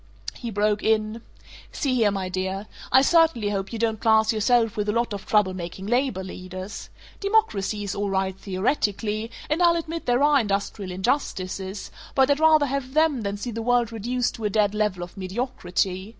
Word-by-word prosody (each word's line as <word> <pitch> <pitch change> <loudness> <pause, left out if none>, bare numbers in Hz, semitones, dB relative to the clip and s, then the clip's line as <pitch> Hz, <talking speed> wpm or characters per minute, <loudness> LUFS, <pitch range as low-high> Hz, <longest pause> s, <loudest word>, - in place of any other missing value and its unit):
He 235 - -6
broke 210 0 +1
in: 220 +1 +1 0.5
"See 275 -3 -1
here, 230 -4 +3
my 195 -2 -2
dear, 190 +2 -3 0.3
I 265 - +6
certainly 315 -10 +3
hope 195 -1 -3
you 230 - -4
don't 220 -1 0
class 220 0 +4
yourself 225 0 +2
with 210 0 -1
a - - +4
lot 235 0 0
of 200 -1 -7
trouble 210 -3 +3
making 180 +1 -6
labor 240 -3 0
leaders! 185 +2 -8 0.3
Democracy 395 - +1
is 200 - -3
all 205 0 -2
right 190 -1 0
theoretically, 210 +2 -1 0.2
and 305 +4 0
I'll 340 -1 +5
admit 330 0 -4
there 245 +3 +3
are 295 -1 +5
industrial 200 -2 -2
injustices, 190 -2 -2 0.2
but 265 0 +4
I'd 285 - +2
rather 310 -2 +5
have 275 0 -3
them 310 -5 +3
than 200 -1 -3
see 240 +4 -5
the 230 0 -4
world 240 0 +2
reduced 240 +3 -1
to 225 - -6
a - - +2
dead 205 0 +2
level 210 -4 0
of 175 - -11
mediocrity. 190 -2 -2
215 Hz, 185 wpm, -24 LUFS, 195-250 Hz, 0.5 s, I